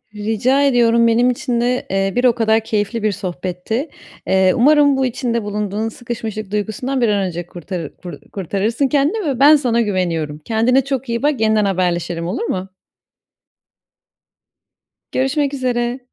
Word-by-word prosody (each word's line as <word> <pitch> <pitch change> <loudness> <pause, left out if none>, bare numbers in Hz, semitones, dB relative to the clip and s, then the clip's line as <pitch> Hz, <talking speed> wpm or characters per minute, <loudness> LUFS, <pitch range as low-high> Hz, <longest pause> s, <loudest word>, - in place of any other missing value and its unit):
Rica 225 +6 +1
ediyorum, 235 -3 +4
benim 235 +2 +3
için 240 -1 -1
de, 250 +1 0
eee, 195 0 0
bir 245 - +1
o 240 -2 +4
kadar 220 -1 +2
keyifli 220 0 -2
bir 215 - +2
sohbetti. 185 - -4 0.4
Eee, 190 -1 +3
umarım 285 +2 +4
bu 265 - +1
içinde 235 -2 -2
bulunduğun 210 +1 -2
sıkışmışlık 220 -3 -6
duygusundan 220 +6 -2
bir 235 - +3
an 200 -2 +1
önce 175 -1 -5
kurtarır 175 -2 -7
kur 175 - -9 0.2
kurtarırsın 205 - -1
kendini 300 +10 +1
ve 265 -4 -1
ben 290 +3 +8
sana 245 -5 +1
güveniyorum. 170 -8 -2
Kendine 230 - +2
çok 270 -2 -3
iyi 235 +3 -2
bak, 290 -5 +1
yeniden 215 -1 +3
haberleşelim, 175 -3 -1
olur 195 +8 -3
mu? 190 -4 -3 2.4
Görüşmek 275 +2 0
üzere. 245 -1 -1
225 Hz, 150 wpm, -18 LUFS, 195-255 Hz, 2.4 s, ben